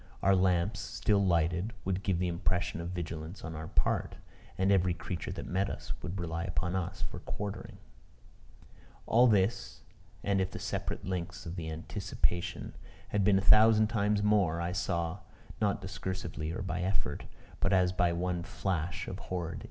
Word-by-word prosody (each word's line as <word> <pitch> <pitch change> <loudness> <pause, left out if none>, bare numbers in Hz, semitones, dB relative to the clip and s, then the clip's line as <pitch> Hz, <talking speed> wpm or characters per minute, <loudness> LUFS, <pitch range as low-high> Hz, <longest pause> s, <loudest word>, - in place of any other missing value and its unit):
Our 95 +1 +6
lamps, 90 +1 +2
still 100 -2 +1
lighted, 90 +4 +2
would 95 0 0
give 95 -3 +1
the 90 +1 +1
impression 90 0 -1
of 85 - -4
vigilance 85 0 -5
on 80 - -5
our 80 0 -5
part. - - 0 0.4
And 95 +1 +3
every 90 -2 +3
creature 85 +1 -4
that - - -6
met 95 +2 0
us, - - -5
would 95 +3 -4
rely 85 -1 -2
upon 85 0 -1
us 95 +1 -2
for - - -4
quartering. 100 -1 -5 1.3
All 120 +2 +6
this, 105 +1 +1 0.4
and 100 -1 +2
if 95 - 0
the - - -7
separate - - -3
links 90 -1 -4
of 85 +1 -5
the 80 -3 -4
anticipation 85 +1 -2 0.4
had 105 -1 +1
been 95 0 +5
a - - +2
thousand 110 +1 +7
times 105 -2 +1
more, 100 -6 +3
I 85 +1 -1
saw 85 -1 -1 0.4
not 100 -1 +2
discursively 95 -4 -4
or 95 - -3
by 90 -1 -2
effort 95 -5 -1 0.3
but 95 - +2
as 90 -2 +4
by 90 -1 +3
one 90 0 -1
flash 85 -1 -2
of - - -5
horrid 90 -3 -3
intuition. 85 - -6
90 Hz, 170 wpm, -31 LUFS, 85-100 Hz, 1.3 s, thousand